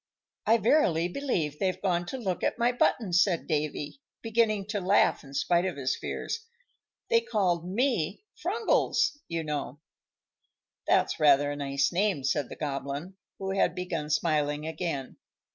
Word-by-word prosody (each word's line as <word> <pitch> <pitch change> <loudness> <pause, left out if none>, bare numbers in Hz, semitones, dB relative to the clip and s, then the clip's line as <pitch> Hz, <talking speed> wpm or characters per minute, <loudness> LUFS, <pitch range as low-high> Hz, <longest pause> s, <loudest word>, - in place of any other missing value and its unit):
"I 225 +2 +6
verily 190 - +3
believe 175 - -2
they're 185 -1 0
gone 175 -3 0
to 265 - -4
look 190 -8 -3
at - - 0
my 240 +1 +3
button," 235 -4 +1
cried 180 -5 -1
Davy, 150 - -2 0.2
beginning 220 -3 +1
to 210 -2 -1
laugh, 190 +3 +3
in 140 -1 -11
spite 175 +4 +2
of 180 -5 -3
his 130 -1 0
fears. - - -4 0.7
"They 460 0 +5
called 180 - 0
me 210 - 0
Frungles, 440 -3 +1
you 165 -1 -2
know." 145 -2 -4 1.1
"That's - - +2
rather 145 -1 +5
a - - -3
nice 140 -1 0
name," 185 -5 +1
said 140 -1 0
the - - -7
Goblin, 140 +4 -4 0.2
who 190 0 -3
had 195 - +1
begun 170 -4 -3
smiling 150 -1 +1
again. 160 -5 -4
175 Hz, 150 wpm, -28 LUFS, 150-210 Hz, 1.1 s, I